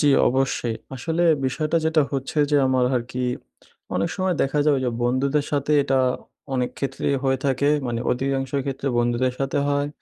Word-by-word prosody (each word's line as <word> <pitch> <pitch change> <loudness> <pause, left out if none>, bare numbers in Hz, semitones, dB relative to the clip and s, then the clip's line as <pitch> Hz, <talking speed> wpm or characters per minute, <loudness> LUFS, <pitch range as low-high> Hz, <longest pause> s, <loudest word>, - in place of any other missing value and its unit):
জি, 150 - +2 0.2
অবশ্যই 130 -3 0 0.2
আসলে 165 +5 -1 0.2
বিষয়টা 155 +5 0
যেটা 160 -1 +3
হচ্ছে 135 +3 -2
যে 145 - +4
আমার 130 -1 +2
আর 120 - +1
কি 125 0 -2 0.7
অনেক 95 - +1
সময় 185 -2 0
দেখা 135 +2 0
যাবে 145 -3 +4
যে 125 - +1
বন্ধুদের 135 +4 +1
সাথে 145 0 0
এটা 135 -1 +1 0.6
অনেক 125 -1 0
ক্ষেত্রেই 140 0 -1
হয়ে 135 -1 +2
থাকে 135 +2 +1 0.2
মানে 120 -1 -2
অধিকাংশ 135 +1 -1 0.2
ক্ষেত্রে 135 0 -4
বন্ধুদের 120 +1 +1
সাথে 135 +1 -1
হয় 145 0 +1
135 Hz, 170 wpm, -23 LUFS, 125-145 Hz, 0.7 s, যে